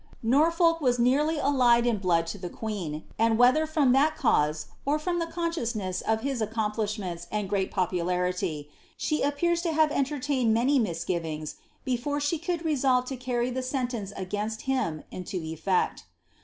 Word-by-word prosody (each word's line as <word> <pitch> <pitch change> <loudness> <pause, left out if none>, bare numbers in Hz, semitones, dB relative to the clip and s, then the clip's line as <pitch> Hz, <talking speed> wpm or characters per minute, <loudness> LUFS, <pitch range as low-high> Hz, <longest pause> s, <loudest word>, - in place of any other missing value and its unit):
"' - - -31
Norfolk 330 +7 +3
was 250 -3 +2
nearly 285 +6 +2
allied 250 -5 +4
in 235 -4 +1
blood 170 -3 +2
to 170 +5 -6
the 180 -1 -5
queen, 180 -10 -5 0.2
and 225 0 +3
wlielher 255 +6 +5
fr< 310 -1 +1
that 280 +4 +3
cause, 150 - +2 0.2
or 290 +2 +1
from 345 +3 -1
the 335 - -1
consciousness 245 - -2
of 220 0 0
his 270 -2 -2
accomplishments 210 -5 -2
and 210 -2 -1
pt 195 -2 +1
popularity, 180 -4 -1 0.3
she 305 - -1
appears 335 +5 +1
to 340 -2 -1
have 310 -1 +3
entertained 275 -5 +1
many 260 +5 +3
misgivings 165 -6 -3 0.3
before 260 +3 -1 0.2
i - - +1
could 340 0 -3
resolve 260 -4 +2
lo 265 - -3
carry 250 0 -1
(he 260 - -2
sentence 250 -6 -3
against 210 +4 -3
him 255 - -1
into 185 0 -5
etfeci. 160 +3 -1
240 Hz, 160 wpm, -27 LUFS, 190-285 Hz, 0.3 s, wlielher